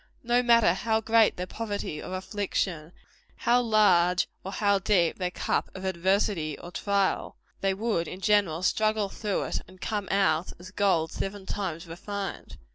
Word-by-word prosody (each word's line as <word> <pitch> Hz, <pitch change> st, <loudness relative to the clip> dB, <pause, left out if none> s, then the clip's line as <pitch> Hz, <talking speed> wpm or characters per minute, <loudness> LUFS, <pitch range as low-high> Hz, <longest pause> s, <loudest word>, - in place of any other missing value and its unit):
No 240 Hz, +1 st, +3 dB
matter 235 Hz, -7 st, +5 dB
how 220 Hz, +3 st, 0 dB
great 225 Hz, 0 st, +3 dB
their 180 Hz, -, -3 dB
poverty 205 Hz, -6 st, -4 dB
or 185 Hz, -, -5 dB
affliction 185 Hz, -4 st, -2 dB, 0.4 s
how 245 Hz, +1 st, +3 dB
large 190 Hz, -6 st, +4 dB, 0.2 s
or 190 Hz, -, -5 dB
how 200 Hz, -1 st, +2 dB
deep 190 Hz, -4 st, +2 dB
their 180 Hz, -1 st, 0 dB
cup -, -, -1 dB
of 190 Hz, 0 st, -6 dB
adversity 185 Hz, -3 st, 0 dB
or 175 Hz, -, -10 dB
trial 200 Hz, 0 st, 0 dB, 0.2 s
they 195 Hz, -1 st, 0 dB
would, 205 Hz, -5 st, -1 dB
in 185 Hz, -, -7 dB
general, 195 Hz, -5 st, +2 dB
struggle 215 Hz, +1 st, +1 dB
through 205 Hz, -1 st, -2 dB
it, -, -, -3 dB
and 185 Hz, 0 st, -16 dB
come 205 Hz, -1 st, -3 dB
out 190 Hz, -4 st, +1 dB
as 185 Hz, +2 st, -12 dB
gold 190 Hz, -6 st, +1 dB
seven 195 Hz, 0 st, -5 dB
times 180 Hz, -4 st, -4 dB
refined. 195 Hz, +4 st, -6 dB
195 Hz, 160 wpm, -27 LUFS, 180-210 Hz, 0.4 s, matter